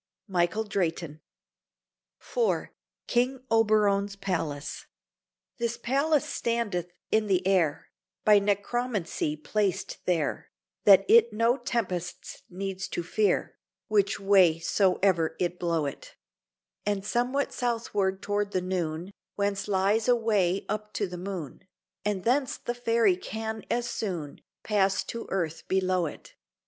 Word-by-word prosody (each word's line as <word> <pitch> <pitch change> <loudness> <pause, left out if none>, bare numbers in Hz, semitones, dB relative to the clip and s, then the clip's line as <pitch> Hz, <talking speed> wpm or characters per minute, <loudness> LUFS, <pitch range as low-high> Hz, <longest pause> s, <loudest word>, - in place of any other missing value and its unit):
Michael 185 +3 +1
Drayton 170 -6 -2 1.0
IV 475 -2 -1 0.4
KING 255 +2 0
OBERON'S 210 -3 +3
PALACE 165 -7 -3 0.7
This 235 0 -1
palace 275 +5 +1
standeth 205 -7 -2 0.2
in 220 -1 +2
the 185 -2 +1
air, 180 -6 +1 0.3
By 210 -1 +7
necromancy 205 -5 -1
placed 195 +5 -1
there, 165 -5 0 0.4
That 195 -1 +8
it 235 0 +6
no 230 +3 +2
tempests 190 -9 -3
needs 190 +1 -4
to 175 - -3
fear, 205 +4 0 0.3
Which 205 -1 +2
way 195 -5 +5
so 185 +3 +2
e'er 170 -5 +2
it 180 0 -1
blow 165 -3 0
it: 140 - -7 0.7
And 205 -1 -1
somewhat 250 +5 0
southward 210 -5 -1
toward 205 0 -1
the 185 - +2
noon 175 -1 -3 0.2
Whence 200 -1 -1
lies 205 +3 +2
a 245 - +6
way 200 -5 +1
up 210 0 -4
to 205 - 0
the 180 -2 -7
Moon, 180 -5 -6 0.4
And 205 -3 -1
thence 260 +2 +1
the 240 - -3
Fairy 230 -5 +2
can 220 +2 -5
as 240 0 0
soon 170 -9 -4 0.2
Pass 195 -2 +2
to 230 - -6
the - - -15
earth 165 -4 -2
below 185 -2 +1
it. - - -10
200 Hz, 130 wpm, -28 LUFS, 180-225 Hz, 1.0 s, That